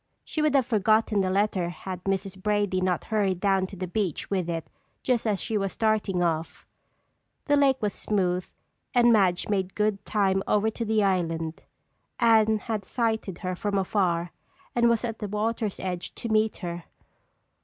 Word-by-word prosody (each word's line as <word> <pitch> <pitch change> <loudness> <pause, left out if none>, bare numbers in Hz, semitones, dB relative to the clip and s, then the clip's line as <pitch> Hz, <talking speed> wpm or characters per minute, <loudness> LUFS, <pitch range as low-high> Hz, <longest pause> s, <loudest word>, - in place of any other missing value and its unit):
She 310 - -3
would 305 -2 +2
have 265 -3 +4
forgotten 215 -2 +2
the 185 - 0
letter 190 -2 +1
had 180 +1 -7
Mrs. 195 0 -2
Brady 205 -2 +1
not 185 -1 0
hurried 200 -4 0
down 195 -1 +2
to 195 - -10
the 185 0 -4
beach 185 -2 -2
with 185 -3 0
it 165 -1 -3 0.4
just 240 -3 +1
as 205 -3 +1
she 220 -3 -1
was 195 -1 -2
starting 215 -5 +1
off. 165 -1 -2 0.8
The 290 - +3
lake 275 -2 +3
was 205 -2 0
smooth 185 -3 0 0.5
and 240 -1 +6
Madge 185 -4 +2
made 190 -3 -1
good 210 -1 0
time 195 -2 +1
over 210 +1 +2
to 230 - -4
the 220 -1 +2
island. 165 -4 -1 0.6
Anne 220 -2 +5
had 215 -1 -3
sighted 220 -3 -1
her 185 0 -1
from 200 +2 -1
afar 180 -3 0 0.4
and 235 -1 +4
was 235 +1 +1
at 225 -1 -4
the 210 - -3
water's 210 0 -2
edge 180 -2 -4
to 230 - -5
meet 215 0 +2
her. 170 0 -5
200 Hz, 175 wpm, -26 LUFS, 185-220 Hz, 0.8 s, and